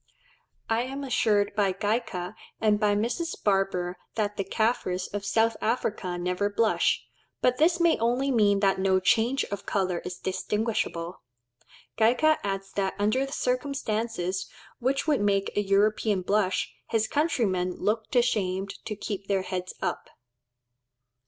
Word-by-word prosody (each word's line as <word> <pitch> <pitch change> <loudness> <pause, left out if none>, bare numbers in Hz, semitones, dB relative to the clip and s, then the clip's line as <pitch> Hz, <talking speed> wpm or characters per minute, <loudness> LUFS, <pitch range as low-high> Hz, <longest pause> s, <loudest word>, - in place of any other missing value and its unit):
I 225 +1 +1
am 270 +3 -4
assured 210 -6 +2
by 200 -3 +2
Gaika 205 -2 -2 0.3
and 210 -1 +3
by 210 -1 +3
Mrs. 245 +11 -1
Barber 195 -3 +1 0.2
that 210 -2 -1
the 195 - -1
Kafirs 190 -3 0
of 205 -1 -3
South 225 +3 +2
Africa 210 -6 -1
never 180 +3 0
blush; 220 +2 +2 0.3
but 250 0 +2
this 340 +3 +4
may 340 -1 +3
only 245 +4 +1
mean 205 -4 +3
that 195 -1 +3
no 190 0 +3
change 230 +7 +2
of 200 0 -5
colour 185 -3 0
is 180 0 -6
distinguishable. 190 -3 -2 0.8
Gaika 250 +8 +4
adds 195 -1 -3
that 195 -1 -1
under 215 +7 +1
the - - -10
circumstances 225 -9 -2 0.3
which 265 +3 0
would 300 -6 +2
make 200 -1 +1
a 205 - +3
European 205 0 +2
blush, 195 -1 +1 0.2
his 220 -1 +1
countrymen 205 - 0
"look 220 +1 -1
ashamed 195 -5 0
to 210 - -3
keep 200 -1 -5
their 195 -2 +1
heads 185 -1 -4
up." - - -2
205 Hz, 140 wpm, -27 LUFS, 195-235 Hz, 0.8 s, this